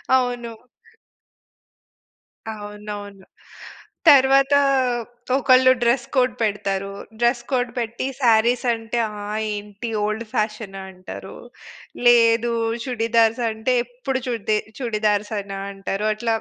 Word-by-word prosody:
అవును. 245 -2 -1 2.0
అవునవును. 205 -2 -8 0.8
తర్వాతా 275 0 +6 0.8
ఒకళ్ళు 255 -1 +5
డ్రెస్ 240 +1 +2
కోడ్ 255 -1 +3
పెడతారు. 195 -2 -1 0.3
డ్రెస్ 240 0 +2
కోడ్ 245 -2 0
పెట్టి 235 +3 -3
సారీస్ 240 +2 +3
అంటే 225 +1 -3
ఆహ్ 210 -1 -8 0.3
ఏంటి 205 +2 -6
ఓల్డ్ 215 +2 -2
ఫ్యాషన్ 210 -2 -2
అంటారు. 185 0 -10 0.7
లేదు, 235 0 +5 0.3
చుడీదార్స్ 230 -1 +2
అంటే 220 +4 -1
ఎప్పుడు 255 +2 -4
చుడ్‌దె 215 -3 0 0.2
చుడీదార్సేనా 210 -3 -1
అంటారు. 195 +2 -3
అట్లా 225 0 0
230 Hz, 90 wpm, -22 LUFS, 210-245 Hz, 2.0 s, తర్వాతా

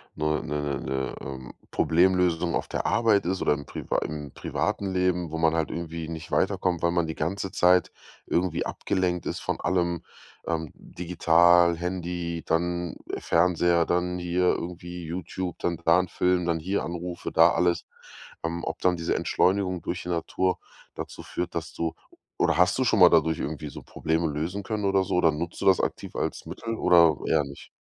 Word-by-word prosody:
'ne 75 0 0
'ne 75 -2 -2
'ne, 65 -1 -3
ähm, 65 -1 -7 0.2
Problemlösung 90 0 +2
auf - - -2
der - - -2
Arbeit 110 -4 +3
ist 95 +2 -1
oder - - +3
im 70 -1 -5
priva - - -3
im 75 -2 -5
privaten 95 -1 -2
Leben, 90 -2 +1
wo 80 - -3
man 80 0 +3
halt 80 -1 0
irgendwie 85 -1 -5
nicht 80 0 -7
weiterkommt, 95 -3 +1
weil 85 - +2
man 85 -1 +1
die 80 - -4
ganze 95 +4 -2
Zeit 90 -3 +4 0.3
irgendwie 90 -2 0
abgelenkt 90 -3 -1
ist - - -3
von - - -2
allem, 85 -2 0 0.4
ähm, 80 -2 -2
digital, 85 0 +3
Handy, 85 -1 -3
dann 85 +1 -1 0.2
Fernseher, 85 0 +2
dann 90 +1 0
hier 90 +1 -1
irgendwie 90 0 -2
YouTube, 90 +2 -5
dann 85 -1 -1
da 85 +2 +6
'n 90 - -1
Film, 90 0 +1
dann 85 -1 0
hier 95 +5 -1
Anrufe, 85 0 -5
da - - +6
alles. 85 +1 +1 0.6
Ähm, 85 +1 -3
ob - - -4
dann 90 -1 +2
diese 85 -1 -1
Entschleunigung 95 -2 +1
durch 90 - -4
die 90 - -6
Natur 90 +2 0 0.3
dazu - - -7
führt, 90 - -4
dass 85 -1 -4
du 80 -1 -2 0.4
oder - - +2
hast 90 +1 +4
du 130 - +2
schon 110 -4 +2
mal 90 - +9
dadurch 80 -1 +3
irgendwie 75 0 -4
so - - -9
Probleme 80 +1 -1
lösen 80 +7 -3
können 105 0 -3
oder 95 -1 +3
so? 95 0 -2
Oder 85 -2 +4
nutzt 85 +3 -5
du - - -2
das 95 -2 +5
aktiv - - -4
als - - -3
Mittel 115 0 -5
oder 85 -6 +5
eher 80 -2 +3
nicht? 70 0 -10
85 Hz, 180 wpm, -26 LUFS, 80-90 Hz, 0.6 s, mal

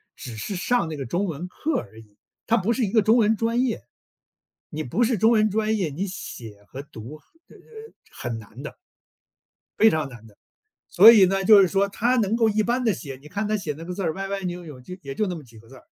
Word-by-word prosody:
只 120 -3 -9
是 200 - -5
上 185 +1 0
那 155 - -5
个 135 - -5
中 175 +12 -1
文 170 -1 -5
课 295 - -3
而 110 - -12
已， 105 -2 -19 0.3
它 230 - +2
不 225 +3 0
是 255 - -1
一 190 - -4
个 220 - +4
中 220 +4 +4
文 220 -1 +3
专 230 +3 0
业， 250 -3 -2 0.9
你 155 -1 -5
不 170 - 0
是 235 -1 +1
中 220 +4 +4
文 215 -2 +3
专 220 +1 0
业， 185 -6 -1
你 170 +8 -4
写 110 - -9
和 135 - -8
读， 140 -2 -11 0.3
呃 - - -18
呃， - - -17 0.5
很 120 -2 -5
难 110 +4 -13
的。 150 - -8 1.0
非 220 - +7
常 155 -5 -1
难 120 -3 -13
的， 105 - -20 0.5
所 210 +5 +9
以 205 -5 +7
呢， 195 +1 0
就 200 0 +8
是 190 - +4
说 195 +2 +1
他 240 +5 +1
能 220 -1 +1
够 230 -1 +3
一 215 +1 +1
般 245 +3 0
地 220 - +3
写， 140 -6 -8
你 150 - -13
看 205 +7 -3
他 215 0 0
写 160 -7 -4
那 165 - -9
个 180 +2 -6
字 195 - -4
儿 160 -2 0
歪 195 +3 -5
歪 200 0 -3
扭 180 -1 -5
扭 150 -6 -11
就 180 +8 -9
也 135 -1 -7
就 215 - 0
那 180 - -3
么 155 - -9
几 115 -3 -17
个 115 - -19
字 130 - -15
儿， 130 - -16
185 Hz, 275 characters per minute, -24 LUFS, 140-215 Hz, 1.0 s, 所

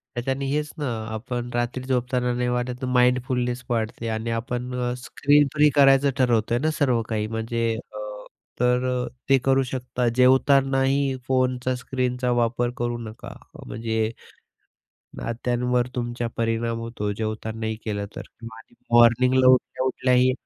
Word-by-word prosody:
तर 120 - -1
त्यानी 135 +1 -1
हेच 150 0 -1
ना, 145 - -2 0.3
आपण 120 +2 -4
रात्री 120 +1 -1
झोपताना 125 -1 0
नाही 125 0 -1
वाटत 125 +1 -2
माइंडफुलनेस 125 0 +1
वाढते 115 0 -2
आणि 110 +1 -3
आपण 125 +1 -4
अ, 125 -1 -1
स्क्रीन 145 +3 +2
फ्री 150 0 +5
करायचं 140 0 +6
ठरवतोय 120 -3 +2
ना 155 +4 +1
सर्व 125 -5 +2
काही 105 -1 -1
म्हणजे 115 +1 -2 0.3
अ, - - -7 0.6
तर 125 +1 +2 0.2
अ, - - -7 0.2
ते 135 - +6
करू 135 0 +3
शकता. 125 -1 -3
जेवतानाही 135 +1 +3
फोनचा 130 -1 +1
स्क्रीनचा 125 0 -2
वापर 120 +1 0
करू 120 -1 -2
नका, 110 - -10 0.2
अ, - - -14
म्हणजे 110 -1 -2 1.1
नात्यांवर 120 +1 -1
तुमच्या 120 -1 -2
परिणाम 115 0 -1
होतो 115 -3 -4
जेवतानाही 110 +1 -3
केलं 100 -2 -2
तर. - - -5 0.3
आणि 115 0 -15 0.2
मॉर्निंगला 125 +2 +5
उठल्या-उठल्याही 130 0 +3
125 Hz, 135 wpm, -24 LUFS, 115-130 Hz, 1.1 s, करायचं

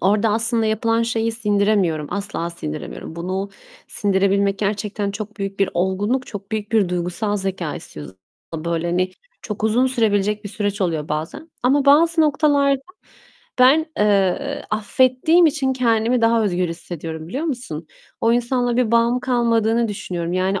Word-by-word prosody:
orada 210 +4 +2
aslında 225 +1 +1
yapılan 225 +1 +1
şeyi 230 -1 0
sindiremiyorum, 200 -8 +1
asla 200 -4 -3
sindiremiyorum. 155 0 -7
Bunu 185 +3 -3 0.4
sindirebilmek 200 -2 +1
gerçekten 205 0 -2
çok 215 +1 -7
büyük 195 -1 -5
bir 195 - +2
olgunluk, 200 +8 0
çok 205 +1 -9
büyük 215 0 -3
bir 205 -5 +3
duygusal 180 +4 -1
zekâ 190 -5 -3
istiyor. 75 -1 -9 0.5
Böyle, 170 +1 -2
hani, 180 +2 0 0.3
çok 210 -1 -5
uzun 235 +4 +3
sürebilecek 210 -4 0
bir - - -4
süreç 205 -1 -3
oluyor 160 -5 -1
bazen. 160 - -5
Ama 270 +3 +3
bazı 325 +4 +5
noktalarda 285 -2 +3 0.8
ben, 280 +6 +5
eee, 210 +7 +1
affettiğim 255 +10 +3
için 280 -3 +1
kendimi 235 -1 +1
daha 230 -1 +3
özgür 180 -3 0
hissediyorum, 165 -1 -6
biliyor 270 - -3
musun? 240 - -4 0.3
O 230 - +3
insanla 245 0 +1
bir 245 -3 +2
bağım 235 +2 +3
kalmadığını 235 -2 +1
düşünüyorum. 175 -4 -4
Yani, 185 +1 0
210 Hz, 145 wpm, -21 LUFS, 190-240 Hz, 0.8 s, bazı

